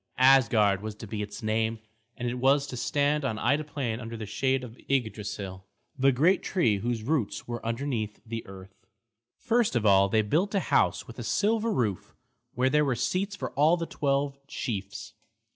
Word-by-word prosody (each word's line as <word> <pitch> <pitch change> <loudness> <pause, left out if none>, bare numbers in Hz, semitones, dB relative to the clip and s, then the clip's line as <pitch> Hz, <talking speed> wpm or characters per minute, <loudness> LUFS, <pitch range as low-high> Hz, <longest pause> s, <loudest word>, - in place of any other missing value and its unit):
Asgard 115 -7 +5
was 110 0 -5
to 110 - -9
be 105 0 -4
its 105 0 -7
name, 110 +1 0 0.4
and 120 - -3
it 125 +1 -3
was 140 +2 +3
to 130 - -7
stand 145 +4 +1
on 115 -5 -1
Ida 145 +7 +1
Plain 130 -6 -3
under 115 -1 -6
the 110 - -5
shade 130 +5 0
of 120 -2 -9
Yggdrasil, 105 -6 -2 0.3
the 135 0 +4
great 165 +9 +3
tree 120 - +1
whose 115 0 -2
roots 135 -4 -1
were 120 0 -5
underneath 115 -3 -3
the 115 0 -5
earth. 95 0 -13 0.5
First 235 - +1
of 115 -3 +1
all 100 -1 +5
they 110 +1 +3
built 175 - 0
a - - +4
house - - +1
with - - -11
a - - -4
silver 225 +2 +1
roof, 110 - -2 0.4
where 130 +1 +2
there 150 +1 +4
were 135 -4 +1
seats 195 - -1
for - - -5
all 155 +5 +3
the 170 - -3
twelve 140 -2 -1
chiefs. 105 -8 -5
125 Hz, 185 wpm, -28 LUFS, 110-145 Hz, 0.5 s, Asgard